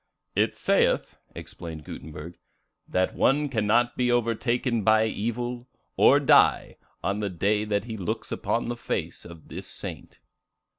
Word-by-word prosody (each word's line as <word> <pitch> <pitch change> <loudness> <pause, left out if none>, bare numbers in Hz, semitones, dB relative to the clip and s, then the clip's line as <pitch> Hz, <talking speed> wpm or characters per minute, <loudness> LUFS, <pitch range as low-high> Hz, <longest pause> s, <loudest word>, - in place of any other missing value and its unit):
"It - - +2
saith," - - +1 0.2
explained 80 -3 -8
Gutenberg, 80 +3 -9 0.5
"that 95 0 0
one 145 +2 +2
cannot 120 +1 +2
be 125 -1 +1
overtaken 120 0 0
by 110 +1 +4
evil, 120 +3 -3 0.3
or - - +6
die, - - +4 0.3
on 100 +1 -1
the 105 -1 -1
day 105 +4 0
that 105 -2 0
he 110 -1 -6
looks 90 -4 -4
upon 115 - -1
the 120 - -2
face 120 - -4
of 85 -2 -12
this - - -7
saint." - - -7
110 Hz, 140 wpm, -26 LUFS, 100-120 Hz, 0.5 s, or